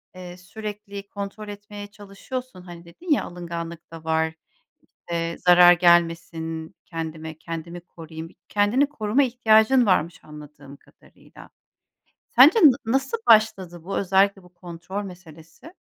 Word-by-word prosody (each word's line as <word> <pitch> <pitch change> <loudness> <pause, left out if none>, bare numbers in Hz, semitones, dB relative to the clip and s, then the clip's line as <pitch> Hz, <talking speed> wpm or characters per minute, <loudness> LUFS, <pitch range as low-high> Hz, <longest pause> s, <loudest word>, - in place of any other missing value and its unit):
iii, 180 -1 -10
sürekli 200 +1 -8
kontrol 205 +1 -7
etmeye 205 0 -9
çalışıyorsun. 205 +2 -9
Hani 175 -1 -12
dedin 320 - -9
ya 295 - +3
alınganlık 170 -1 -8
da 165 -1 -11
var, 160 0 0 0.8
eee, 170 0 -2
zarar 175 0 +7
gelmesin 165 -2 +1
kendime, 160 -1 -7
kendimi 165 +2 -7
koruyayım, 165 -1 -11
bir - - -23
kendini 210 +8 +2
koruma 230 -1 0
ihtiyacın 240 -1 +3
varmış 170 -4 +1
anladığım 150 -2 -13
kadarıyla. - - -19 0.8
Sence 290 - +6
na 285 - +6
nasıl 270 - -1
başladı 195 -6 +3
bu 195 - -4
özellikle 195 0 +2
bu 180 - -20
kontrol 175 +3 -7
meselesi? 175 - -13
180 Hz, 125 wpm, -23 LUFS, 165-210 Hz, 0.8 s, zarar